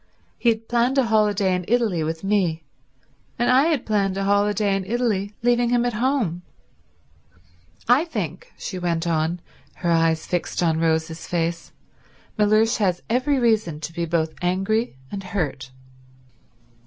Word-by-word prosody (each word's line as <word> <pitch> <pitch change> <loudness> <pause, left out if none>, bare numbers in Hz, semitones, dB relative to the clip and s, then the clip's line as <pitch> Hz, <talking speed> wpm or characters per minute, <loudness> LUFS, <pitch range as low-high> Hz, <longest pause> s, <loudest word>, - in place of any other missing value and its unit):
He 240 - +3
had 225 0 -1
planned 240 +3 +1
a 270 - +5
holiday 210 -4 +2
in 180 0 -1
Italy 220 -8 +1
with 160 +2 -4
me, 185 -5 0 0.7
and 240 +1 +2
I 265 +3 +5
had 315 -6 0
planned 200 -3 0
a 195 - -1
holiday 205 0 +2
in 195 - -2
Italy 210 -2 -1
leaving 240 0 +3
him 245 0 +2
at 245 - 0
home. 225 - 0 1.5
I 250 +7 +4
think," 185 - -5
she 185 - -5
went 170 -1 -1
on, 165 +1 0 0.3
her 170 -1 -1
eyes 165 -1 +2
fixed 175 0 -2
on 160 -2 +2
Rose's 160 0 -1
face, 165 -1 -2 0.6
"Mellersh 215 +2 +3
has 185 -5 0
every 265 +4 +2
reason 220 - +1
to 155 +1 -6
be 170 0 -2
both 160 -1 -1
angry 195 - 0 0.2
and 200 - -4
hurt." 160 -8 -3
195 Hz, 150 wpm, -23 LUFS, 170-230 Hz, 1.5 s, a